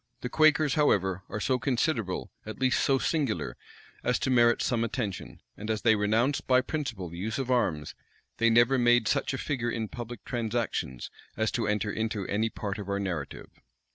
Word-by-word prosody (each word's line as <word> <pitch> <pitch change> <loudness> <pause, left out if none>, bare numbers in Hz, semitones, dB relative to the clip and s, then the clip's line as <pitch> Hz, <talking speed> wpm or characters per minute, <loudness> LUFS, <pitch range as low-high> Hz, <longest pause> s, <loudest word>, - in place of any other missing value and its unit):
The 125 - -3
Quakers, 155 -1 +4
however, 95 - +2
are 105 - -4
so 130 +4 +1
considerable, 120 - -1
at 110 - -7
least 130 -1 +2
so 135 - +3
singular, 140 -5 -1 0.5
as - - +2
to 130 - -1
merit 120 -1 +4
some 115 -2 0
attention; 115 -5 -4
and 105 +2 -7
as 110 -1 -1
they 115 -2 +5
renounced 110 +7 +1
by 130 -1 +5
principle 120 - -4
the 85 +1 -9
use 110 +4 -2
of 130 -2 -2
arms, 85 -12 0 0.4
they 115 0 +4
never 120 +3 +4
made 120 -2 +4
such - - +1
a 135 - -3
figure 130 -4 -2
in 115 -2 -2
public 120 -3 -8
transactions 115 - -2 0.3
as 110 +1 +1
to 115 - -1
enter 105 0 0
into 110 -2 -2
any 110 +4 0
part 105 -1 -5
of 100 -1 -6
our 100 0 0
narrative. 85 -8 -4
115 Hz, 185 wpm, -28 LUFS, 105-125 Hz, 0.5 s, they